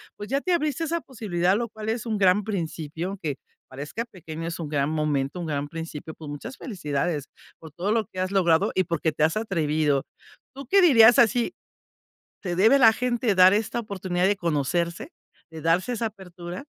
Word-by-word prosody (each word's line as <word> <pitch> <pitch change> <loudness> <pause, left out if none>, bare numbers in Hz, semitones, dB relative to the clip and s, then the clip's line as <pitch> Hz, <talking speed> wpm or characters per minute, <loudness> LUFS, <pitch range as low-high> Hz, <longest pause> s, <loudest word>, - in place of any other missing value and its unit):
pues, 205 - -8
ya 275 +2 0
te 365 - 0
abriste 305 -2 0
esa 335 +1 -1
posibilidad, 195 - -1
lo 235 0 -3
cual 215 0 -6
es 225 +1 -2
un 220 -2 -1
gran 195 +1 +4
principio, 170 -2 -4
que, 155 - -2
aunque 140 - -4 0.3
parezca 145 - -6
pequeño, 165 -7 -8
es 170 - -5
un 160 -3 -5
gran 145 -1 0
momento, 150 0 -1
un 175 - -4
gran 145 -1 -2
principio. 160 -1 -7
Pues, 155 -2 -10
muchas 145 - -7
felicidades 150 - -3 0.3
por 160 -1 -12
todo 180 +7 -2
lo 225 -1 +1
que 185 - -9
has 185 0 0
logrado 170 -5 +3
y 185 - +3
porque 165 -1 -1
te 150 - -1
has 160 +6 +2
atrevido, 155 -8 0 0.5
¿tú 275 -1 -9
qué 395 +8 +5
dirías 240 -8 +7
así? 240 +1 +3 0.9
¿Se 175 -3 -2
debe 220 +9 +5
la 225 -3 +7
gente 240 -2 0
dar 185 +1 +7
esta 220 +2 -1
oportunidad 185 -5 -2
de 205 - +2
conocerse, 170 +1 -1 0.4
de 160 -1 -8
darse 175 +9 +1
esa 230 -1 -2
apertura? 180 -1 -9
180 Hz, 195 wpm, -25 LUFS, 160-225 Hz, 0.9 s, dirías